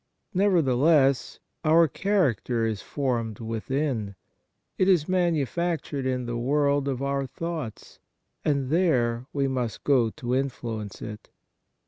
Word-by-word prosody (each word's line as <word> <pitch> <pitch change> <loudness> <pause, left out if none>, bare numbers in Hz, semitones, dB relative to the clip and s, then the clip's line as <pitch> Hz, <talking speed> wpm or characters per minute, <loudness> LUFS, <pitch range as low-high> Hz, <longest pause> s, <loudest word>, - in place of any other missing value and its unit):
Nevertheless, 150 -7 +3 0.3
our 165 +1 +5
character 130 - +1
is 110 -4 -2
formed 120 -6 -2
within. 115 -1 -2 0.6
It 185 - +4
is 170 -6 +4
manu 175 -6 +2
factured 165 -3 -2
in 125 -1 -1
the 120 0 -3
world 140 +2 +1
of 135 -1 -2
our 140 0 -1
thoughts, 155 -4 -6 0.4
and 140 -3 0
there 130 -8 +2
we 140 -1 0
must 125 -4 -3
go 125 -5 +3
to 125 0 -4
influence 120 -6 -3
it. 105 0 -8
135 Hz, 120 wpm, -26 LUFS, 120-155 Hz, 0.6 s, our